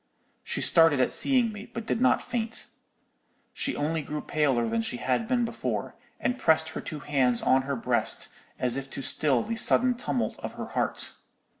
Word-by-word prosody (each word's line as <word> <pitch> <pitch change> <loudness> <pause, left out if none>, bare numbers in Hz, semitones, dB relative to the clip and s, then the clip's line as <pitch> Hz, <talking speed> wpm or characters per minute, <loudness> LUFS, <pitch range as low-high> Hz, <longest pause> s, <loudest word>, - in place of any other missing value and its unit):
"She - - -3
started 165 -4 +5
at 130 - +2
seeing 250 -4 +3
me, 210 0 -9
but 230 -2 -6
did 225 - -1
not 260 - +3
faint. 225 -2 -3 0.8
She - - -2
only 155 +2 -1
grew 150 +1 -5
paler 135 -6 +1
than 115 0 0
she 120 +2 -4
had 130 - -1
been 245 -1 +1
before, 230 - -4 0.3
and 250 +1 -1
pressed 160 -3 +3
her - - -6
two 150 -2 -7
hands 130 -5 +1
on 130 - +4
her 140 - 0
breast, 115 - +1 0.3
as 125 0 0
if 135 0 -5
to 135 - -5
still 135 -6 +3
the 230 - -3
sudden 250 +2 +3
tumult 140 - -3
of - - -6
her - - -7
heart. - - +1
150 Hz, 185 wpm, -27 LUFS, -, 0.8 s, started